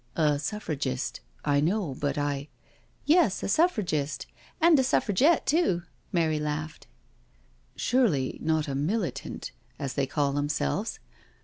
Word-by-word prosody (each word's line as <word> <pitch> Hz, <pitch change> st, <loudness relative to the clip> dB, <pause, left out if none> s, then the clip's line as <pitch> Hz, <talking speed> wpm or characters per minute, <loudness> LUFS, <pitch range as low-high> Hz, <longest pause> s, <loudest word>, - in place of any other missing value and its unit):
•' -, -, -39 dB, 0.3 s
A 145 Hz, -1 st, +1 dB
Suffragist— 145 Hz, -7 st, -3 dB, 0.3 s
I 145 Hz, -1 st, +3 dB
know, 175 Hz, -1 st, 0 dB
but 140 Hz, +1 st, -2 dB
I 145 Hz, 0 st, -2 dB, 0.2 s
'" -, -, -33 dB
" -, -, -36 dB
Yes, 300 Hz, -, +3 dB
a -, -, -1 dB
Suffragist 195 Hz, -, +1 dB, 0.3 s
and 325 Hz, -2 st, +6 dB
a -, -, +4 dB
Suffragette 260 Hz, -, +3 dB
too." 280 Hz, -, +2 dB, 0.3 s
Mary 160 Hz, -4 st, +1 dB
laughed. 150 Hz, +1 st, -4 dB, 0.5 s
" -, -, -36 dB
Surely 205 Hz, -, +2 dB
not 160 Hz, -1 st, +1 dB
a 140 Hz, -, -3 dB
Militant, 175 Hz, +8 st, -2 dB, 0.3 s
as 135 Hz, -2 st, -3 dB
they 140 Hz, -2 st, 0 dB
call 140 Hz, 0 st, 0 dB
themselves? 145 Hz, -, -1 dB
155 Hz, 140 wpm, -28 LUFS, 140-210 Hz, 0.5 s, and